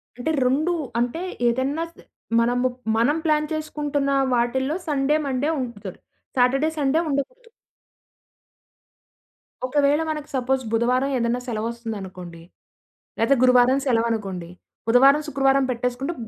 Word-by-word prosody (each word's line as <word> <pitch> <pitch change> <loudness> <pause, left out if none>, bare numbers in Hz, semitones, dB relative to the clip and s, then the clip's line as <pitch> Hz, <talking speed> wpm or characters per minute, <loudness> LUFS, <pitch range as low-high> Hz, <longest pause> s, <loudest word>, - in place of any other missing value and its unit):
అంటే 250 +7 -2
రొండు 305 +7 +2 0.3
అంటే 245 +8 -1 0.3
ఏదైనా 265 +7 0
స్ - - -34 0.4
మనము 245 +2 +2 0.3
మనం 280 +7 +2
ప్లాన్ 305 -1 +2
చేసుకుంటున్న 295 -2 -2 0.2
వాటిల్లో 260 +5 0
సండే, 285 0 +1
మండే 275 +2 -1
ఉంచుతారు. 210 -7 -6 0.4
సాటర్‌డే 270 +5 +3
సండే 290 +2 +2
ఉండకూడదు. 460 - -4 2.2
ఒకవేళ 285 +3 +2
మనకు 300 -1 -4
సపోజ్ 260 +1 0
బుధవారం 250 +4 +1
ఏదైనా 235 0 0
సెలవోస్తుందనుకోండి. 215 -7 -5 0.8
లేదా 230 +5 +4
గురువారం 250 +1 +5
సెలవనుకోండి. 220 -7 -1 0.4
బుధవారం 270 +5 +6
,శుక్రవారం 275 -1 +2
పెట్టేసుకుంటే 250 +6 -2
260 Hz, 105 wpm, -23 LUFS, 235-290 Hz, 2.2 s, బుధవారం